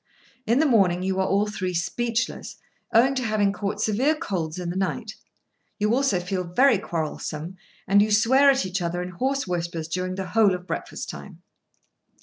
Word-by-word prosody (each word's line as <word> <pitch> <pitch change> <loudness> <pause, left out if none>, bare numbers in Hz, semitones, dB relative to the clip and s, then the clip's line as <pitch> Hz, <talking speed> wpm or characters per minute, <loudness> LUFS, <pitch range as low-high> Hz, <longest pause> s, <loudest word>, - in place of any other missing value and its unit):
In 230 +3 +3
the 315 - +4
morning 190 - +3
you 190 0 -1
are 190 - +1
all 200 +2 +2
three 185 -4 -3
speechless, 230 +6 -2 0.4
owing 255 +4 +4
to 260 -1 -2
having 215 -3 +1
caught 200 0 -3
severe 255 +9 +2
colds 170 - -3
in 175 -1 -3
the - - -6
night; 210 +4 -2 0.6
you 210 +1 +1
also 255 -7 +2
feel 180 +1 -3
very 225 +6 +3
quarrelsome, 160 0 -4 0.3
and 200 +2 +5
you 215 - +2
swear 255 +7 +5
at 270 -6 +2
each 185 0 -3
other 175 +1 -2
in 180 - -6
hoarse 265 +9 -1
whispers 170 -2 -3
during 185 +2 -3
the 190 -1 -5
whole 210 -4 +4
of 180 0 -9
breakfast - - -5
time. - - -10
195 Hz, 180 wpm, -24 LUFS, 180-230 Hz, 0.6 s, and